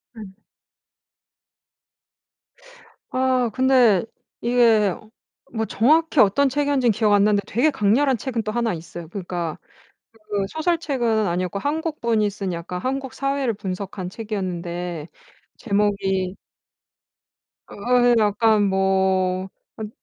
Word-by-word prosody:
음. 210 -4 -10 2.8
아 255 -2 +1
근데 255 -7 +4 0.4
이게 230 -5 +3 0.6
뭐 220 -1 -1
정확히 310 +8 +2
어떤 265 +7 +4
책이었는지 285 -2 +1
기억 215 -2 +3
안 200 -1 +5
나는데 205 -1 +3
되게 250 +9 +2
강렬한 255 +3 +2
책은 230 -1 -3
또 215 - -3
1 235 -1 0
있어요. 170 0 -8
그러니까 175 -3 -4 0.6
그 215 -3 -4
소설책은 280 - 0
아니었고 180 +2 -2
한국분이 285 -7 -1
쓴 195 -2 -4
약간 175 +2 -5
한국 265 +3 -3
사회를 275 -3 -1
분석한 190 -2 -5
책이었는데 180 -6 -5 0.5
제목이 200 -3 0 1.4
어어 245 +2 +3
약간 215 0 +3
뭐 190 -1 +1 0.3
아니 215 -1 -5
215 Hz, 230 characters per minute, -22 LUFS, 190-250 Hz, 2.8 s, 안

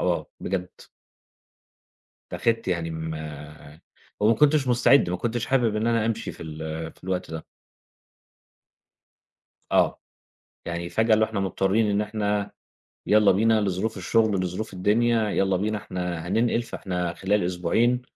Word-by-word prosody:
آه - - -1
بجد. 90 -1 -2 1.6
اتّاخدت 115 -2 0
يعني 85 -2 -1
أما 75 -2 -7 0.4
وما 110 +2 +4
كنتش 145 +2 +3
مستعد 120 -3 +4
ما 90 - -1
كنتش 120 +4 -2
حابب 120 -5 +2
إن 110 +2 0
أنا 115 -2 +2
أمشي 115 -1 -2
في - - -11
ال 80 0 -6
في - - -20
الوقت 90 -2 -3
ده. 80 -1 -6 2.3
آه - - +3 0.7
يعني 85 0 -3
فجأة 110 +4 +3
اللي 110 0 +3
هو - - -5
إحنا 110 -3 -2
مضطرين 95 +3 +1
إن 100 0 +1
إحنا 105 -1 -1 0.6
يالّا 105 -1 +5
بينا 110 +3 +3
لظروف 100 +2 -1
الشغل، 110 +2 +2
لظروف 95 +4 -4
الدنيا، 110 +4 +2
يالّا 95 -2 +1
بينا 105 +3 -1
إحنا 90 -4 -4
هننقل 115 +5 +1
فإحنا 90 -6 -4
خلال 100 +3 0
أسبوعين. 90 +8 +1
100 Hz, 135 wpm, -25 LUFS, 90-115 Hz, 2.3 s, يالّا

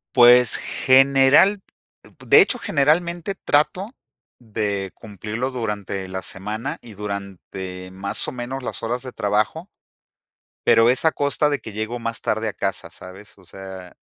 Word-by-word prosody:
Pues, 125 -2 +6
general, 135 +9 +4 0.5
uh, - - -16 0.2
de - - +7
hecho, 250 - +4
generalmente 170 - 0
trato 180 +7 +1 0.5
de 105 -4 -3
cumplirlo 110 +4 -5
durante 105 -5 -4
la 95 0 -5
semana 105 +9 -4
y 115 - -13
durante 95 -2 -7
más 95 +1 0
o - - -7
menos 125 +2 -6
las - - -4
horas 120 +2 -3
de 130 - -7
trabajo. 110 - -1 1.0
Pero, 115 +1 +5
es 130 +5 +2
a 160 - +5
costa 145 +1 +1
de 145 - -1
que 110 -2 -10
llego 110 +3 -4
más 115 0 -4
tarde 110 +1 -1
a 105 - -3
casa, 95 -4 -4
¿sabes?, 95 +5 -13
o 95 - -20
sea 95 -1 -11
115 Hz, 150 wpm, -21 LUFS, 100-135 Hz, 1.0 s, de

